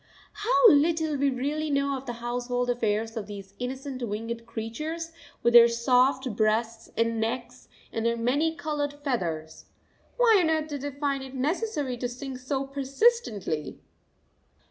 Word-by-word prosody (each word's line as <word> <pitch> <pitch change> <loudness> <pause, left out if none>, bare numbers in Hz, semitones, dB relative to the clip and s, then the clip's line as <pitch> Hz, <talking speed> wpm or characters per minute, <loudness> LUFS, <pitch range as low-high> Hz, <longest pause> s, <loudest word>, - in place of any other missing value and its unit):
How 445 +1 +5
little 315 +1 +3
we 280 0 +2
really 290 +4 -2
know 280 -1 +1
of 265 0 -7
the 240 - -3
household 245 +1 -2
affairs 225 -1 -1
of 215 -3 -4
these 200 -2 -9
innocent 260 +1 -5
winged 230 +1 -4
creatures, 305 +10 -5 0.3
with 235 - +3
their 235 -1 +10
soft, 250 +1 +2
breasts 220 +1 0
and 230 0 +1
necks 240 +2 -4 0.2
and 225 - -2
their 235 0 +1
many 285 +8 +1
coloured 290 -1 -2
feathers! 165 - -3 0.5
Why 460 -4 +6
on 325 - +2
earth 315 -1 0
do 290 -1 -4
they 285 +2 -3
find 280 0 -2
it 265 0 -9
necessary 290 - -1
to 245 0 -2
sing 260 +2 -6
so 265 +2 -2
persistently? 270 - 0
255 Hz, 150 wpm, -27 LUFS, 230-290 Hz, 0.5 s, their